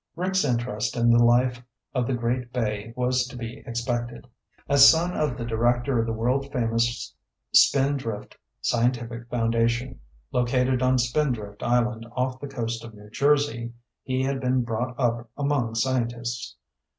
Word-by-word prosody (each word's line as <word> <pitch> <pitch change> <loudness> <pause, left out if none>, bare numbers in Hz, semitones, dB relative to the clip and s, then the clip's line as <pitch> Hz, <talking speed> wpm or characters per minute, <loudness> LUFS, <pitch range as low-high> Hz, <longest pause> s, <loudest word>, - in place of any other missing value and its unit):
Rick's 185 +2 0
interest 120 -5 -1
in 120 0 +4
the 120 0 +5
life 120 +1 +3 0.3
of 125 -3 0
the 130 - 0
great 120 +1 -2
bay 110 -3 -2
was 125 0 +1
to 125 - -10
be 120 +3 -7
expected. 120 0 -3 0.4
As 140 0 +8
son 170 +3 +2
of 145 -5 -1
the 120 - -4
director 120 +2 +1
of 115 - 0
the - - -1
world 125 +5 -1
famous 115 -1 -1 0.4
Spindrift 135 -6 +2 0.3
Scientific 120 0 -1
Foundation, 115 - 0 0.3
located 125 +1 +1
on 130 0 +3
Spindrift 120 -5 -1
Island 120 -1 0
off 130 +1 -2
the 145 - -6
coast 115 -4 -4
of 115 -2 -10
New 105 0 -14
Jersey, 140 -2 +1 0.3
he 130 0 -1
had 135 0 -1
been 125 -1 +1
brought 120 +3 -3
up 120 -2 0
among 140 -6 0
scientists. 120 -1 -2
120 Hz, 150 wpm, -25 LUFS, 115-130 Hz, 0.4 s, As